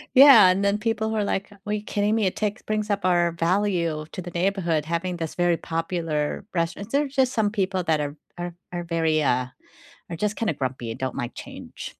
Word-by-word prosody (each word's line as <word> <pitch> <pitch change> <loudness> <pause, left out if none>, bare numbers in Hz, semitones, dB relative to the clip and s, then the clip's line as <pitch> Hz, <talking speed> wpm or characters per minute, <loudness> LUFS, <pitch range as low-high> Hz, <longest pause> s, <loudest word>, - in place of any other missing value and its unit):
Yeah, 260 -8 +9
and 185 +2 +2
then 200 +1 +2
people 220 0 -1
who - - -2
are 210 - +1
like, 200 +1 -2
"Well 210 0 -1
you 210 - -3
kidding 205 0 0
me, 220 -3 +2
it 185 - 0
takes 210 -1 -2
brings 215 0 -2
up 200 0 -1
our 175 -2 +3
value 170 -2 0
to 185 - -5
the 175 - -7
neighborhood 175 -3 0
having 170 +2 -2
this 165 -2 -4
very 175 -1 +2
popular 165 -3 -2
rest" 165 0 0
and 200 +2 -8
there's 280 -1 0
just 260 -2 +3
some 220 -4 +1
people 195 -3 -1
that 160 -2 +1
are 145 0 -3 0.2
are 175 0 -4 0.2
are 175 -1 -3
very, 160 -2 +1
uh 125 -2 +1 0.6
are 170 - -4
just 210 +5 -1
kinda 220 -8 0
grumpy 130 -4 -3
and 115 - -7
don't 130 0 -3
like 120 - -4
change. - - -9
180 Hz, 220 wpm, -24 LUFS, 165-210 Hz, 0.6 s, Yeah